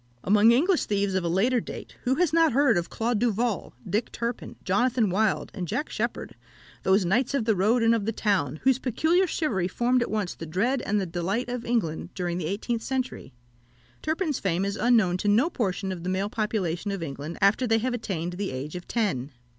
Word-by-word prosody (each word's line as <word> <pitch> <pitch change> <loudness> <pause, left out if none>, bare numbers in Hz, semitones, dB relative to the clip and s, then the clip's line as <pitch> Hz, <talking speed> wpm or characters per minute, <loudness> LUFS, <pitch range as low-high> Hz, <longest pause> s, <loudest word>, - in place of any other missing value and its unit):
Among 210 +4 +5
English 330 +9 +3
thieves 200 -1 0
of 190 -1 0
a - - -1
later 230 +9 +2
date, - - -8
who 255 +2 +2
has 340 -1 +1
not 325 -4 +4
heard 275 -3 +4
of 175 -1 -1
Claude 230 -1 -1
Duval, 230 - -1
Dick 215 +3 -1
Turpin, 235 0 -4
Jonathan 225 +2 +2
Wild, 210 +2 +1
and 185 -4 -4
Jack 295 - -2
Sheppard, - - -3 0.5
those 190 0 +3
knights 240 +9 +1
of 235 - 0
the 220 -2 +3
road 220 +6 +2
and 225 0 +5
of 220 -3 -1
the - - +2
town, 175 - 0
whose 265 -1 +3
peculiar 320 - +2
chivalry 225 - 0
formed 245 +6 +1
at - - -1
once 210 -4 -1
the 165 - -8
dread 235 - 0
and 210 +1 +2
the 195 - -1
delight 185 +8 -2
of 245 -1 -4
England 195 -10 -1
during 175 -1 -2
the 160 - -3
eighteenth 225 +5 -2
century? 260 - -3 0.7
Turpin's 315 -2 -1
fame 185 0 0
is 200 0 -2
unknown 220 -7 +3
to 205 - -3
no 235 +12 +3
portion 195 - -2
of 180 -2 -5
the 180 - -2
male 195 +2 -1
population 205 -4 -1
of 195 -4 -3
England 145 +2 -6
after 210 +6 +3
they 225 0 +3
have 245 +3 -1
attained 180 -7 -3
the 195 +2 -3
age 135 +5 -5
of 180 - -7
ten. 145 - -1
210 Hz, 210 wpm, -26 LUFS, 185-245 Hz, 0.7 s, Among